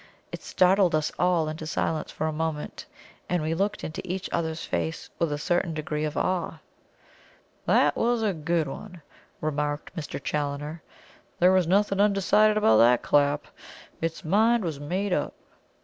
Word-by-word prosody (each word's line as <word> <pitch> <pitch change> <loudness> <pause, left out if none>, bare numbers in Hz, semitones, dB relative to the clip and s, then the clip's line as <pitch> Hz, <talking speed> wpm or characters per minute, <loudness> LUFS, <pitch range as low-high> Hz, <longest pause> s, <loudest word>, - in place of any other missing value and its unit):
It - - -7
startled 185 -2 +3
us 155 -1 0
all 175 -3 +2
into 155 0 -5
silence 155 -1 -1
for 155 - -3
a 160 - -1
moment, 155 -1 -4 0.4
and 175 -3 0
we 160 +1 0
looked 200 +5 -1
into 155 - -5
each 185 +1 -4
other's 160 -1 -2
faces 160 - -3
with 165 -3 +1
a 145 - -1
certain 170 +2 0
degree 155 0 -2
of 150 +1 -4
awe. 180 -3 -1 1.1
"That - - +4
was 235 -1 +1
a 210 -3 +1
good 165 -1 0
one," 180 +4 -9 0.4
remarked 150 +1 -2
Mr. 160 -5 -5
Challoner. 145 +2 -3 0.6
"There 180 +1 +5
was 185 -3 +3
nothing 195 +2 +2
undecided 210 +1 +4
about 110 - +5
that 120 +2 +5
clap. 145 0 +2 0.6
Its 165 0 -3
mind 220 +6 +3
was 160 -5 -3
made 185 +6 -2
up." - - -1
165 Hz, 160 wpm, -26 LUFS, 150-185 Hz, 1.1 s, There